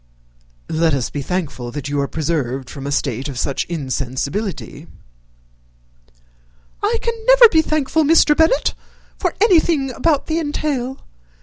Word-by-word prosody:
"Let 160 -1 +2
us 130 -4 -3
be 145 - -4
thankful 145 -7 -4
that 145 -1 -5
you 145 0 -1
are 140 - -1
preserved 135 -5 -3
from 140 -1 -7
a - - -3
state 135 0 -2
of 135 - -7
such 135 +2 -1
insensibility." 140 - -4 1.9
"I 435 +3 +1 0.3
never - - +9
can - - -12
be 320 - +5
thankful, 310 0 0
Mr. 305 0 +5
Bennet, 320 +11 +2 0.5
for 360 - -1
anything 330 - +3
about 295 +3 0
the 320 +1 -1
entail. 285 -4 -3
185 Hz, 135 wpm, -19 LUFS, -, 1.9 s, never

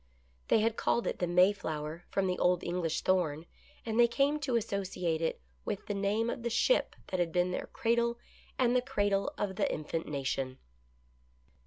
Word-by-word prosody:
They 220 - +4
had 225 +1 +1
called 235 - +1
it - - -2
the 180 - 0
Mayflower 175 -3 +1
from 195 - 0
the 180 -1 -1
old 180 -1 +3
English 170 -2 -1
thorn, 165 -4 +1 0.4
and 225 0 -1
they 240 - +7
came 280 +5 +1
to 275 -4 -1
associate 190 -7 -1
it 165 - -1 0.2
with - - -4
the - - -2
name 205 +3 0
of 235 - -3
the 235 - -1
ship 370 - +2
that 185 - -2
had 170 -2 +1
been 180 +1 +1
their - - -3
cradle 235 -1 +1 0.4
and 250 -1 +3
the 250 - +4
cradle 205 -6 0
of 190 -2 -2
the - - +1
infant 160 +2 -3
nation. 135 -2 -2
195 Hz, 180 wpm, -31 LUFS, 170-230 Hz, 0.4 s, they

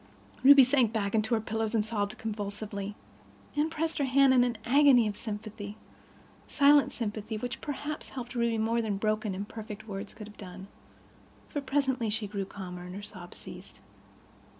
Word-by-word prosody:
Ruby 275 0 +10
sank 255 -3 +3
back 205 -3 -1
on 220 - +4
her 220 +1 +1
pillows 220 +1 -2
and 210 -2 +2
sobbed 215 0 -2
convulsively. 205 -1 -4 0.6
Anne 300 +2 +2
pressed 320 0 -2
her 285 - +2
hand 270 0 +5
in 250 -1 +6
an 240 -2 -1
agony 265 -3 +6
of 205 - -3
sympathy—silent 220 +7 -1
sympathy, 215 -1 -4
which 245 +2 -5
perhaps 295 +1 -5
helped 245 -2 -7
Ruby 235 -2 +1
more 225 +2 +1
than 210 -3 -1
broken, 215 -1 0
imperfect 210 +2 -7
words 200 0 -6
could 215 -1 -8
have 210 - -14
done; 190 0 -9 0.8
for 290 - -3
presently 265 -4 0
she 210 0 -2
grew 200 -1 -3
calmer 180 -2 -8
and 180 +1 -8
her 205 - -7
sobs 185 -4 -10
ceased. - - -11
220 Hz, 165 wpm, -29 LUFS, 205-250 Hz, 0.8 s, Ruby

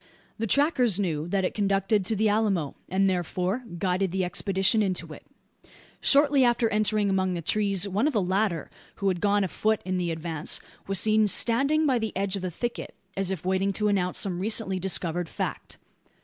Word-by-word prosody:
The 225 - -1
trackers 255 - +2
knew 160 -5 -2
that 190 +1 0
it - - -2
conducted 200 0 +1
to 220 - 0
the 215 +1 +1
Alamo; 205 -8 0
and, 195 +2 +2
therefore, 185 +5 -1
guided 185 +1 0
the 190 0 -1
expedition 195 +4 +1
into 190 -3 -2
it. - - -13 0.8
Shortly 280 -1 +4
after 240 -1 +2
entering 215 -1 +1
among 190 -2 0
the 170 - -4
trees, 200 +1 +1
one 200 +8 0
of 305 - -1
the 215 - +2
latter, 185 -3 -1 0.2
who 200 - 0
had 180 -2 -2
gone 205 0 +2
afoot 215 +3 0
in 185 0 -1
the 175 -1 -1
advance, 160 -1 -2 0.3
was 195 -2 +1
seen 215 +1 +3
standing 275 +9 +3
by 260 -4 +2
the 220 -3 -4
edge 195 0 -1
of 195 - -4
the 185 - -3
thicket, 240 +8 -5 0.2
as 195 -1 -1
if 190 -2 -5
waiting 190 +1 +1
to 210 +1 0
announce 185 -3 0
some 180 -3 0
recently 195 -1 0
discovered 175 -2 -1
fact. - - -5
195 Hz, 190 wpm, -26 LUFS, 185-215 Hz, 0.8 s, Shortly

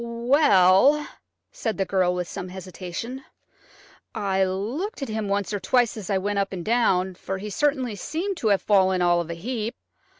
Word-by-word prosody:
"Well," 235 - +4 0.4
said 225 -2 -3
the 195 - 0
girl 185 -2 +1
with 180 -1 -3
some 180 - -6
hesitation, 190 +7 -7 0.9
"I 195 -1 +1
looked 235 - -3
at 270 - -5
him 215 -1 -2
once 200 +1 -1
or 205 - -1
twice 245 +2 +2
as 210 -5 -7
I 195 - +2
went 200 +1 -1
up 195 0 -1
and 180 -3 -6
down, 190 -5 +2
for 190 +1 -5
he 210 +2 -6
certainly 265 -4 0
seemed 340 - -3
to 230 - -1
have 200 -2 +2
fallen 190 -3 +3
all 175 0 +3
of 170 - -8
a 170 - -4
heap. 225 +5 -4
200 Hz, 180 wpm, -24 LUFS, 185-240 Hz, 0.9 s, Well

